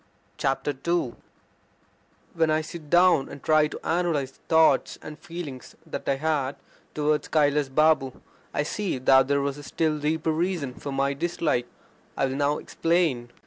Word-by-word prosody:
II 140 +1 -1 1.2
When 160 -1 +2
I 155 0 +2
sit 155 -1 -9
down 175 -5 +4
and 140 -2 -10
try 155 -1 +4
to - - -8
analyse 165 -6 0
the - - -27
thoughts 160 -1 +4
and 155 0 -9
feelings 165 -7 -8
that 160 - -5
I 135 - +3
had 145 -2 -1 0.4
towards 150 0 0
Kailas 145 -2 +2
Babu 150 -2 +2 0.3
I 145 - 0
see 195 +1 -2
that 130 +1 +5
there 140 0 +2
was 140 +1 -2
a - - -10
still 155 0 -1
deeper 160 +2 0
reason 160 -5 -1
for 140 - -7
my 135 +1 0
dislike. 150 -5 -1 0.5
I - - +2
will 130 0 -2
now 145 +1 +1
explain. 165 -8 0
150 Hz, 155 wpm, -26 LUFS, 135-160 Hz, 1.2 s, that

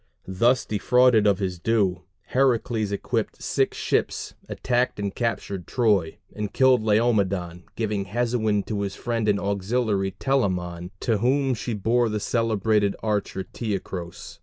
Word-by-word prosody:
Thus 120 +7 +2
defrauded 115 +1 +3
of 100 -2 +3
his 95 -3 -3
due, 95 -4 +1 0.2
Heracles 120 -5 +1
equipped 100 - -2
six - - 0
ships, - - -1 0.2
attacked 125 0 0
and 100 -1 -2
captured 100 -5 -3
Troy, 105 -10 +1 0.2
and 105 -1 -3
killed 130 -3 +4
Laomedon, 100 -6 +1
giving 105 -3 -2
Hesione 110 -1 0
to 105 -2 -3
his 100 -1 -3
friend 115 -1 -1
and 100 -1 +2
auxiliary 100 0 -1
Telamon, 90 -10 -1
to 115 -4 +1
whom 135 +3 +2
she 115 0 -3
bore 115 +3 +1
the 105 0 -2
celebrated 110 -2 +1
archer 105 -3 -1
Teucros. 95 -6 -6
105 Hz, 135 wpm, -24 LUFS, 100-120 Hz, 0.2 s, killed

